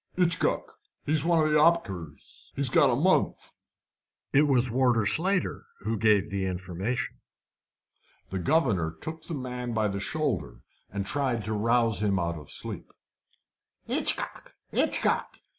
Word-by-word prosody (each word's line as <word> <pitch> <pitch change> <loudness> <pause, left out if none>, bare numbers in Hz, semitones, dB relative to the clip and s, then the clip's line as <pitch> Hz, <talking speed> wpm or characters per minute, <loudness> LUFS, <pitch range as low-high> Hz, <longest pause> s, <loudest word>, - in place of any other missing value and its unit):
"'Itchcock. 175 -2 +1 0.4
He's 155 0 +2
one 165 -2 +3
of 155 - +1
the 150 - +5
'oppickers. 95 - -1
He's - - 0
got - - +5
a - - +2
month." - - +1 0.8
It 145 +2 +5
was 130 -3 +3
Warder 120 -2 +2
Slater 185 - +1 0.2
who 110 +3 -1
gave 105 -5 +3
the 95 -1 -1
information. 95 +7 -3 1.1
The 95 - -2
governor 95 - +1
took 160 0 -7
the 165 - -3
man 125 -3 -4
by 110 -1 +2
the 100 0 -3
shoulder, 140 - -2 0.3
and 100 0 -3
tried 125 -3 -1
to 110 - -1
rouse 115 -1 +2
him 100 -2 +2
out 85 -2 -2
of 75 - -13
sleep. - - -6 0.9
"Hitchcock! - - -2 0.2
Hitchcock! - - +1
115 Hz, 140 wpm, -28 LUFS, 100-150 Hz, 1.1 s, the